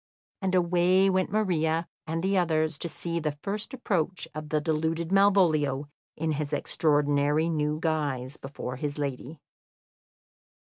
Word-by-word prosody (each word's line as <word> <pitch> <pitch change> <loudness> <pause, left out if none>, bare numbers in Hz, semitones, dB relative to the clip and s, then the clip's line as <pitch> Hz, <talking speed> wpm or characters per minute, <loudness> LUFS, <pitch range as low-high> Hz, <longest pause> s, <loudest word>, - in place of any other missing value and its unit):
And 190 -1 0
away 180 +2 +4
went 185 0 +1
Maria 170 -6 +1 0.2
and 165 +1 -2
the 195 +1 +1
others 160 -3 +1
to 170 - -2
see 170 +1 -3
the 150 -2 -2
first 205 +1 -3
approach 190 -8 -1
of 155 0 -6
the 155 - +2
deluded 160 +2 -1
Malvolio 160 -8 +3 0.3
in 160 +1 -1
his 150 -1 -2
extraordinary 145 +1 +2
new 150 -1 0
guise 145 -5 -1
before 130 -2 -6
his 145 +2 -3
lady. 145 +1 -4
160 Hz, 135 wpm, -27 LUFS, 150-180 Hz, 0.3 s, away